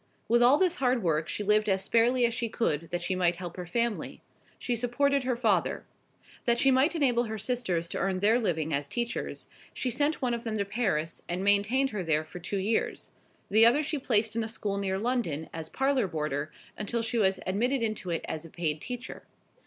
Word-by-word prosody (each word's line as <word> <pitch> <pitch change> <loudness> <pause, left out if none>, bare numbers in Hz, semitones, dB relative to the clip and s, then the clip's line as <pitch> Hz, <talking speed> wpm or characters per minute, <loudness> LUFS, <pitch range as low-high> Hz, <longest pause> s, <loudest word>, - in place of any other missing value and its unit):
With 235 +2 +4
all 250 +4 +6
this 365 0 +2
hard 250 -3 +1
work 160 -2 0
she 210 - -3
lived 210 +1 +3
as 190 0 +1
sparely 240 +2 +3
as 235 - 0
she 230 -1 -2
could, 165 - -1
that 175 0 -3
she 185 - -1
might 175 -1 +2
help 175 -1 -7
her 180 -1 -6
family. 235 +3 -2 0.3
She 245 - -1
supported 265 +3 +1
her 250 -1 +1
father. 215 -7 +1 0.6
That 235 -1 +3
she 270 +2 +4
might 270 +6 +3
enable 245 -6 +2
her 220 -1 -4
sisters 215 -7 -1
to - - -3
earn 190 -1 0
their 215 +5 +4
living 160 -6 -1
as 140 0 -1
teachers, 235 +8 -3 0.3
she 255 - -1
sent 290 +5 +1
one 250 -3 0
of 235 0 -3
them 220 -2 -2
to 200 - 0
Paris, 190 -7 -1
and 180 +2 -2
maintained 205 +7 +2
her 210 -3 -3
there 155 -3 +1
for 180 - -9
two 195 +4 -3
years; 210 +4 -1 0.4
the 220 +2 +6
other 245 +7 +5
she 305 0 -2
placed 220 -4 +1
in 230 - 0
a - - -3
school 205 -3 -3
near 190 -1 -1
London 205 - -2
as 160 -1 -6
parlour 270 -4 +1
boarder 150 -3 -3 0.2
until 230 +2 -2
she 230 +1 -1
was 190 -2 +2
admitted 235 +7 0
into 215 -4 -3
it 165 -1 -2
as 155 0 -4
a 165 - -10
paid 155 -2 -2
teacher. 250 0 -6
220 Hz, 215 wpm, -29 LUFS, 180-245 Hz, 0.6 s, all